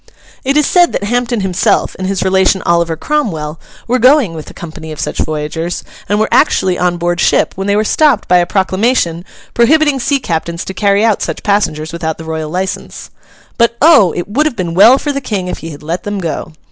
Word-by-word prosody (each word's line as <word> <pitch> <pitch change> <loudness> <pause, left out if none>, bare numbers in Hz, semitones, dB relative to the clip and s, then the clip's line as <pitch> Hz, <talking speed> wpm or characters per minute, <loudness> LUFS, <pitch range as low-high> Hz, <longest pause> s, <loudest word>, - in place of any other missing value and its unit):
It 275 +2 +1
is 300 - +3
said 350 -1 +3
that - - -2
Hampden 240 +1 -1
himself 185 -2 0
and 185 - -2
his 195 0 -1
relation 190 0 +2
Oliver 170 -1 +1
Cromwell 165 - -2 0.3
were 250 +2 +1
going 255 - +4
with 155 -2 -8
a - - -12
company 160 -1 -9
of 155 - -8
such - - -3
voyagers, 155 +3 -3 0.3
and 205 +1 +1
were 220 - +2
actually 185 -1 +2
on 175 -1 +1
board 175 0 -1
ship, - - +2
when 195 +1 -4
they 200 - +2
were 210 - +2
stopped 275 0 +2
by 180 - +4
a 175 - 0
proclamation, 190 -2 0 0.3
prohibiting 290 +3 +3
sea 280 +3 +1
captains 170 -5 -3
to 190 - -6
carry 200 +2 +2
out 220 -3 +1
such 160 - -4
passengers 160 -7 -1
without 160 -2 -3
the 165 - -9
royal 160 -1 -4
license. 185 +3 -5 0.5
But 235 0 +2
O! 285 - +6
it 175 - -4
would 280 +10 +1
have 300 - -4
been 180 -5 -3
well 215 +9 +7
for 290 +1 -3
the 275 - -3
King 200 -7 -3
if - - -5
he 165 - -7
had 145 -1 -11
let 165 +4 -3
them 205 0 -4
go! 165 -3 -4
190 Hz, 215 wpm, -14 LUFS, 170-235 Hz, 0.5 s, well